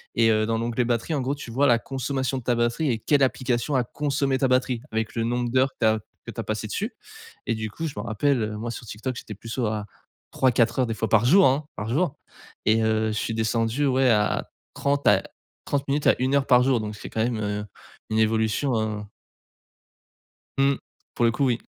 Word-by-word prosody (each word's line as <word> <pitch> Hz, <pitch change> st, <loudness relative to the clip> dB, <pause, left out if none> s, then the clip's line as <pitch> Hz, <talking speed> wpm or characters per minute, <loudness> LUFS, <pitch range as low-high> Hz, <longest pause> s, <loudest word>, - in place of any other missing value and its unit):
et 115 Hz, -1 st, +4 dB
heu, 110 Hz, 0 st, +2 dB
dans 115 Hz, 0 st, 0 dB
l'onglet 120 Hz, +1 st, 0 dB
batterie 120 Hz, +6 st, -1 dB
en 135 Hz, -, 0 dB
gros, 135 Hz, +3 st, -1 dB
tu 140 Hz, -5 st, -9 dB
vois 140 Hz, +4 st, +3 dB
la 120 Hz, -, +5 dB
consommation 135 Hz, +2 st, -2 dB
de -, -, -12 dB
ta 120 Hz, 0 st, +1 dB
batterie 120 Hz, +6 st, 0 dB
et 115 Hz, -, 0 dB
quelle 145 Hz, +5 st, +2 dB
application 130 Hz, +1 st, 0 dB
a 125 Hz, -, +3 dB
consommée 140 Hz, 0 st, -1 dB
ta 135 Hz, -, +3 dB
batterie, 125 Hz, -2 st, +1 dB
avec 110 Hz, 0 st, -2 dB
le 115 Hz, -, 0 dB
nombre 120 Hz, 0 st, -1 dB
d'heures 130 Hz, +1 st, +3 dB
que -, -, -52 dB
tu -, -, +4 dB
as 110 Hz, 0 st, +2 dB, 0.3 s
que -, -, -6 dB
tu -, -, -9 dB
as -, -, -1 dB
passé 110 Hz, 0 st, -3 dB
dessus. 215 Hz, -, -3 dB, 0.5 s
Et 115 Hz, -, +1 dB
du 110 Hz, 0 st, -4 dB
coup 165 Hz, -, -5 dB
je 145 Hz, -, -6 dB
m'en 105 Hz, -, -3 dB
rappelle, 120 Hz, +4 st, +1 dB
heu, 105 Hz, 0 st, -3 dB
moi 115 Hz, +2 st, -4 dB
sur 120 Hz, -, -8 dB
Tik 105 Hz, -, -9 dB
Tok, 130 Hz, -2 st, -2 dB
j'étais 105 Hz, -, -8 dB
plus 115 Hz, +3 st, -11 dB
sur 115 Hz, -1 st, -1 dB
à 105 Hz, -1 st, -4 dB, 0.5 s
3-4 125 Hz, -1 st, +2 dB
heures 125 Hz, -, +2 dB
des 115 Hz, -, -2 dB
fois 110 Hz, +2 st, -2 dB
par 110 Hz, +1 st, +4 dB
jour, 190 Hz, +10 st, +6 dB
hein, 135 Hz, +3 st, +1 dB
par 105 Hz, +2 st, -4 dB
jour 150 Hz, +2 st, 0 dB, 0.5 s
et 110 Hz, +1 st, +4 dB
heu, 110 Hz, 0 st, +1 dB
je -, -, -2 dB
suis 115 Hz, -, -2 dB
descendu, 115 Hz, +4 st, 0 dB
ouais, 130 Hz, -1 st, +3 dB
à 105 Hz, -2 st, +1 dB, 0.3 s
30 140 Hz, 0 st, 0 dB
à 105 Hz, -2 st, +6 dB, 0.4 s
30 140 Hz, 0 st, -1 dB
minutes 145 Hz, +2 st, +1 dB
à -, -, +6 dB
1 130 Hz, +2 st, +1 dB
heure 140 Hz, -1 st, +2 dB
par 125 Hz, -1 st, +6 dB
jour 130 Hz, -2 st, +2 dB
donc 105 Hz, 0 st, -5 dB
c'est -, -, -9 dB
quand 110 Hz, -, -2 dB
même, 115 Hz, -2 st, -1 dB
heu, 105 Hz, 0 st, -2 dB, 0.5 s
une 110 Hz, -, +1 dB
évolution, 110 Hz, +4 st, +1 dB
heu 105 Hz, -1 st, -2 dB, 1.5 s
Mmh. 135 Hz, 0 st, +3 dB, 0.4 s
Pour 120 Hz, -, +2 dB
le 115 Hz, -, +4 dB
coup, 135 Hz, +4 st, 0 dB
oui. 120 Hz, -3 st, +1 dB
120 Hz, 235 wpm, -25 LUFS, 110-135 Hz, 1.5 s, jour